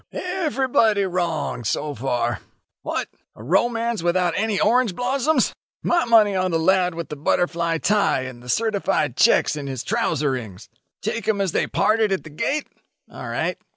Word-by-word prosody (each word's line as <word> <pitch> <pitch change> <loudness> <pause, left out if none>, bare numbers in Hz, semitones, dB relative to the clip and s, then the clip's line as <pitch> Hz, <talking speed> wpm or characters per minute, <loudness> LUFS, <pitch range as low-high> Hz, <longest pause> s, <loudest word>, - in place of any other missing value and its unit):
"Everybody 270 - +1
wrong 175 -8 -2
so 145 +7 -2
far. 120 -2 -1 0.4
What! - - -3 0.3
a 110 - -12
romance 230 - +1
without 175 0 +1
any 215 -1 0
orange 230 -3 +2
blossoms! 265 +3 +1
Ho, - - -15
ho! - - -10
My 345 -1 +3
money 220 -4 +5
on 185 0 +1
the 165 - +1
lad 180 +1 +2
with 170 0 -6
the 150 - -5
butterfly 170 +2 0
tie 200 -4 +2
and 130 -2 -8
the 125 - -12
certified 195 - 0
checks 150 - +4
in 145 -2 -5
his 130 -3 -4
trouserings. 135 - -2 0.3
"Take 230 - -3
'em 215 -2 +1
as 195 -3 0
they - - 0
parted 215 -1 +2
at 190 - -1
the 155 - -11
gate? 285 - -1 0.5
All - - -7
right. - - -2
185 Hz, 170 wpm, -22 LUFS, 150-225 Hz, 0.5 s, money